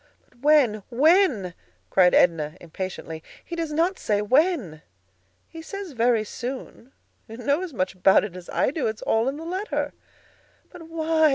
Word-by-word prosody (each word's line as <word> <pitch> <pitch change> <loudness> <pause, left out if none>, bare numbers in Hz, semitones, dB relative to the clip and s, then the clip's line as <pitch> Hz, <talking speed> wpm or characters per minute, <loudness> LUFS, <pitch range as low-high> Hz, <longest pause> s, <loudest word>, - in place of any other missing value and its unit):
"But 250 - -28
when, 270 -7 +4
when?" 270 - +3 0.4
cried 180 -2 +5
Edna, 165 -2 +2
impatiently. 170 -2 -6 0.2
"He 340 - -6
does 330 -2 -3
not 335 +5 0
say 205 -1 0
when." 250 - +1 0.7
"He 325 - -10
says 395 +1 -7
'very 235 -3 +2
soon.' 250 +2 -7 0.4
You 225 - -9
know 280 +7 0
as 370 -3 -5
much 185 -7 -2
about 190 +1 +4
it 200 -4 -6
as 180 -1 -10
I - - +1
do; 285 -5 -1
it 220 - -2
is - - -17
all 225 +3 +1
in 275 - -5
the 325 - -8
letter." 375 +5 -3 0.8
"But 330 -3 -12
why? 320 -1 +2
255 Hz, 170 wpm, -24 LUFS, 200-325 Hz, 0.8 s, cried